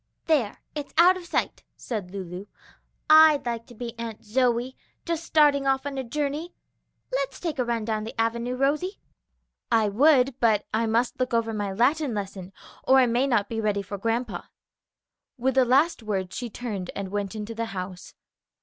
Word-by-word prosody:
"There, 275 Hz, -11 st, +1 dB, 0.2 s
it's 295 Hz, -2 st, -6 dB
out 355 Hz, +3 st, +7 dB
of 360 Hz, -2 st, -9 dB
sight," -, -, -1 dB, 0.2 s
said 210 Hz, -7 st, -5 dB
Lulu. 185 Hz, 0 st, -7 dB, 0.6 s
"I'd 310 Hz, -2 st, +7 dB
like 230 Hz, -1 st, -3 dB
to 240 Hz, -, -14 dB
be 235 Hz, +1 st, -6 dB
Aunt 225 Hz, -2 st, -6 dB
Zoe, 245 Hz, +2 st, +1 dB, 0.3 s
just 335 Hz, -1 st, -2 dB
starting 290 Hz, -4 st, +3 dB
off 270 Hz, 0 st, +1 dB
on 275 Hz, -1 st, -3 dB
a -, -, -2 dB
journey. 295 Hz, +6 st, -3 dB, 0.6 s
Let's -, -, -2 dB
take 320 Hz, -6 st, -3 dB
a -, -, +3 dB
run 235 Hz, -2 st, -2 dB
down 215 Hz, -1 st, -1 dB
the 225 Hz, +1 st, -8 dB
avenue, 235 Hz, +2 st, 0 dB
Rosie." 300 Hz, +9 st, 0 dB, 0.7 s
"I 225 Hz, -2 st, +3 dB
would, 265 Hz, +2 st, +4 dB
but 220 Hz, -3 st, +3 dB
I 225 Hz, +1 st, +1 dB
must 235 Hz, +3 st, 0 dB
look 255 Hz, -2 st, 0 dB
over 225 Hz, -1 st, 0 dB
my 205 Hz, -2 st, -2 dB
Latin 260 Hz, +5 st, +1 dB
lesson, 195 Hz, -2 st, -5 dB, 0.3 s
or 265 Hz, -, +5 dB
I 260 Hz, -, +6 dB
may 245 Hz, +3 st, +1 dB
not 225 Hz, -6 st, +1 dB
be 225 Hz, -1 st, -3 dB
ready 205 Hz, -2 st, 0 dB
for 200 Hz, +1 st, -7 dB
grandpa." 225 Hz, -2 st, -2 dB, 0.9 s
With 260 Hz, +2 st, +1 dB
the 260 Hz, 0 st, +4 dB
last 280 Hz, +5 st, +3 dB
words 195 Hz, -4 st, -3 dB
she 245 Hz, -1 st, -4 dB
turned 205 Hz, -6 st, -5 dB
and 200 Hz, -1 st, -4 dB
went 200 Hz, 0 st, -3 dB
into 215 Hz, +1 st, -5 dB
the 230 Hz, 0 st, -3 dB
house. 185 Hz, -4 st, -7 dB
235 Hz, 180 wpm, -26 LUFS, 215-275 Hz, 0.9 s, out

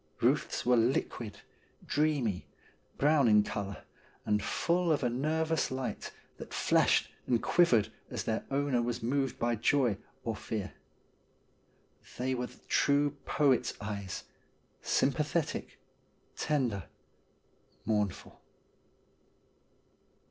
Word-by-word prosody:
Buth's -, -, +1 dB
were 125 Hz, 0 st, +5 dB
liquid, 115 Hz, -3 st, 0 dB, 0.4 s
dreamy, 140 Hz, -10 st, 0 dB, 0.5 s
brown 145 Hz, -2 st, +4 dB
in 105 Hz, -1 st, +6 dB
colour, 100 Hz, -1 st, -5 dB, 0.4 s
and 105 Hz, 0 st, +2 dB
full 170 Hz, -, +1 dB
of 150 Hz, -, +1 dB
a 120 Hz, -, +1 dB
nervous 160 Hz, +5 st, 0 dB
light, 130 Hz, -1 st, -4 dB, 0.3 s
that -, -, -8 dB
flashed -, -, +3 dB, 0.2 s
and 120 Hz, -2 st, +3 dB
quivered 125 Hz, -, +3 dB, 0.2 s
as -, -, -3 dB
their 110 Hz, 0 st, -1 dB
owner 140 Hz, -3 st, +1 dB
was 120 Hz, 0 st, -2 dB
moved 135 Hz, +2 st, 0 dB
by 120 Hz, 0 st, +1 dB
joy 120 Hz, -2 st, +2 dB, 0.2 s
or 115 Hz, -2 st, -2 dB
fear. 105 Hz, -2 st, -4 dB, 1.4 s
They 130 Hz, +1 st, 0 dB
were 125 Hz, -1 st, -2 dB
the -, -, -17 dB
true 145 Hz, 0 st, +3 dB
poet's 130 Hz, -4 st, +2 dB
eyes; 100 Hz, -2 st, -5 dB, 0.6 s
sympathetic, 150 Hz, +4 st, 0 dB, 0.6 s
tender, 120 Hz, -, 0 dB, 1.0 s
mournful. 105 Hz, -4 st, -2 dB
125 Hz, 105 wpm, -31 LUFS, 110-145 Hz, 1.4 s, in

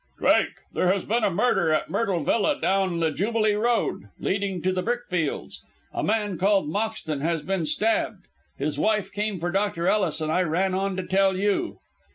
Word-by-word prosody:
"Drake, -, -, +3 dB, 0.2 s
there 180 Hz, -, +2 dB
has 195 Hz, -1 st, -1 dB
been 230 Hz, +2 st, +1 dB
a -, -, +4 dB
murder 190 Hz, -3 st, +2 dB
at 155 Hz, -, 0 dB
Myrtle 195 Hz, -8 st, 0 dB
Villa 280 Hz, -, +1 dB
down 190 Hz, -3 st, +1 dB
the 160 Hz, -1 st, +2 dB
Jubilee 215 Hz, +5 st, +1 dB
Road, 215 Hz, -, 0 dB
leading 195 Hz, -1 st, -1 dB
to 185 Hz, 0 st, +1 dB
the 185 Hz, -, -1 dB
brickfields. 185 Hz, -9 st, -2 dB, 0.3 s
A -, -, -2 dB
man 210 Hz, -4 st, 0 dB
called 195 Hz, -2 st, +3 dB
Moxton 200 Hz, -6 st, -2 dB
has 165 Hz, 0 st, -1 dB
been 185 Hz, -2 st, -1 dB
stabbed. 215 Hz, -2 st, 0 dB, 0.3 s
His 145 Hz, +1 st, -2 dB
wife 215 Hz, +2 st, +1 dB
came 205 Hz, -2 st, -2 dB
for 175 Hz, +2 st, -2 dB
Dr. 195 Hz, -3 st, 0 dB
Ellis, 185 Hz, -7 st, +1 dB
and 155 Hz, 0 st, -1 dB
I 180 Hz, -, +2 dB
ran 185 Hz, +3 st, +1 dB
on 195 Hz, 0 st, -1 dB
to 185 Hz, -, -2 dB
tell 190 Hz, 0 st, +2 dB
you!" 205 Hz, -, 0 dB
195 Hz, 185 wpm, -25 LUFS, 170-210 Hz, 0.3 s, a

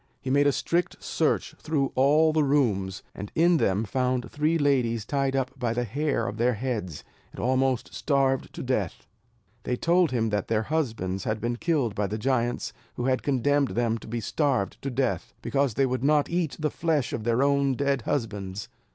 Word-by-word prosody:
He 130 Hz, -, -4 dB
made 145 Hz, +1 st, +4 dB
a -, -, +5 dB
strict 170 Hz, +5 st, -1 dB
search -, -, 0 dB
through 145 Hz, -4 st, 0 dB
all 150 Hz, +4 st, +4 dB
the 155 Hz, -1 st, +3 dB
rooms; 110 Hz, -10 st, +1 dB
and 100 Hz, +1 st, -7 dB
in 170 Hz, +1 st, +4 dB
them 100 Hz, -5 st, +1 dB
found 125 Hz, +3 st, -1 dB
three 155 Hz, +3 st, +1 dB
ladies 125 Hz, -7 st, +1 dB
tied 135 Hz, +1 st, 0 dB
up 130 Hz, -1 st, 0 dB
by 120 Hz, -3 st, 0 dB
the 120 Hz, -, 0 dB
hair 135 Hz, 0 st, -1 dB
of 105 Hz, -, -5 dB
their 120 Hz, +1 st, +2 dB
heads, 105 Hz, -, -3 dB, 0.3 s
and -, -, -11 dB
almost 130 Hz, -7 st, +1 dB
starved 135 Hz, -, +1 dB
to -, -, -5 dB
death. -, -, -2 dB, 0.6 s
They 125 Hz, -, -1 dB
told 170 Hz, +5 st, +3 dB
him 115 Hz, -3 st, 0 dB
that 105 Hz, -2 st, -1 dB
their 110 Hz, -1 st, +1 dB
husbands 110 Hz, -, -2 dB
had 110 Hz, 0 st, -1 dB
been 120 Hz, +2 st, -2 dB
killed 140 Hz, -, 0 dB
by 105 Hz, 0 st, -1 dB
the 105 Hz, -, -3 dB
giants, 120 Hz, 0 st, -1 dB, 0.2 s
who 120 Hz, -, -3 dB
had 130 Hz, -1 st, +2 dB
then -, -, -20 dB
condemned 145 Hz, +1 st, +2 dB
them 115 Hz, -1 st, +1 dB
to -, -, -12 dB
be 115 Hz, +1 st, -3 dB
starved 130 Hz, -4 st, 0 dB
to 135 Hz, -, -3 dB
death, 130 Hz, +1 st, -2 dB
because 140 Hz, -5 st, 0 dB
they 135 Hz, -, +3 dB
would 130 Hz, 0 st, -2 dB
not 150 Hz, +1 st, +3 dB
eat 170 Hz, -4 st, -1 dB
the 155 Hz, -1 st, -1 dB
flesh 155 Hz, -6 st, 0 dB
of 110 Hz, -, -3 dB
their 120 Hz, +3 st, +2 dB
own 140 Hz, -1 st, +2 dB
dead 140 Hz, 0 st, 0 dB
husbands. 105 Hz, -6 st, -3 dB
130 Hz, 195 wpm, -26 LUFS, 115-145 Hz, 0.6 s, a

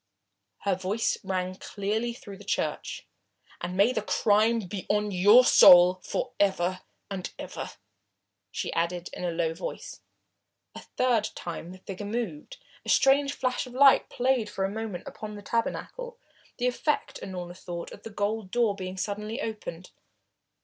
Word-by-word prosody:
Her 200 Hz, -, +1 dB
voice 190 Hz, +5 st, -1 dB
rang 185 Hz, -1 st, -2 dB
clearly 215 Hz, +5 st, -2 dB
through 205 Hz, -4 st, -10 dB
the 205 Hz, -, -13 dB
church. 200 Hz, -, -2 dB, 0.6 s
"And 180 Hz, +1 st, -4 dB
may 210 Hz, +6 st, +4 dB
the 220 Hz, -, 0 dB
crime 215 Hz, +2 st, +3 dB
be 190 Hz, 0 st, -6 dB
on 210 Hz, 0 st, +1 dB
your 205 Hz, +7 st, +7 dB
soul 180 Hz, -2 st, +8 dB
for 250 Hz, -, -3 dB
ever 185 Hz, -2 st, +1 dB, 0.3 s
and 190 Hz, -2 st, -4 dB
ever," -, -, -6 dB, 0.8 s
she -, -, -4 dB
added 170 Hz, +1 st, -1 dB
in -, -, -6 dB
a 175 Hz, -, 0 dB
low 165 Hz, -1 st, 0 dB
voice. 165 Hz, -, -7 dB, 0.7 s
A -, -, -8 dB
third 235 Hz, -4 st, 0 dB
time 170 Hz, 0 st, -6 dB
the 185 Hz, -, -10 dB
figure 195 Hz, +2 st, -7 dB
moved. 210 Hz, -9 st, -4 dB, 0.3 s
A -, -, -7 dB
strange 280 Hz, +1 st, +4 dB
flash 255 Hz, 0 st, -1 dB
of 250 Hz, -, -11 dB
light 275 Hz, +1 st, +6 dB
played 250 Hz, -3 st, +1 dB
for 190 Hz, -, -2 dB
a -, -, -1 dB
moment 215 Hz, -3 st, -5 dB
upon 210 Hz, -1 st, -7 dB
the 205 Hz, -, -10 dB
tabernacle, 480 Hz, -, -3 dB, 0.4 s
the 245 Hz, -, -1 dB
effect, 250 Hz, +4 st, -1 dB
Unorna 180 Hz, -2 st, -6 dB
thought, 175 Hz, -2 st, -7 dB
of -, -, -11 dB
the -, -, -8 dB
golden 205 Hz, -1 st, -2 dB
door 235 Hz, -1 st, +2 dB
being 185 Hz, -1 st, -6 dB
suddenly 210 Hz, +4 st, -3 dB
opened. 210 Hz, -, -6 dB
205 Hz, 155 wpm, -28 LUFS, 185-230 Hz, 0.8 s, soul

